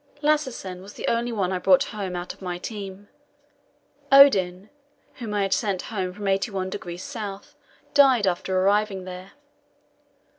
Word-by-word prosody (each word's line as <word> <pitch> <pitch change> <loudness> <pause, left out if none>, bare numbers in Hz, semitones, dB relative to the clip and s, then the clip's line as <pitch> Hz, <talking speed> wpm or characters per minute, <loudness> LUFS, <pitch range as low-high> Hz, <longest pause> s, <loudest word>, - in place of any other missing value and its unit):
Lassesen 260 -12 -1
was 200 +2 -11
the - - -5
only 235 +1 0
one 195 -5 -1
I 185 - -1
brought 185 0 +5
home 195 -5 -5
out 175 0 -5
of - - -23
my 180 -2 -4
team. 200 0 -7 1.0
Odin, 200 -9 +6 0.5
whom 230 -4 -6
I 205 -1 +1
had 195 - +1
sent 200 -5 0
home 185 -3 -2
from 205 +2 -8
81° 195 +2 -3 0.2
S., 200 - -20 0.4
died 265 -7 +5
after 185 0 0
arriving 200 0 +1
there. 185 +1 -9
195 Hz, 145 wpm, -24 LUFS, 185-215 Hz, 1.0 s, Odin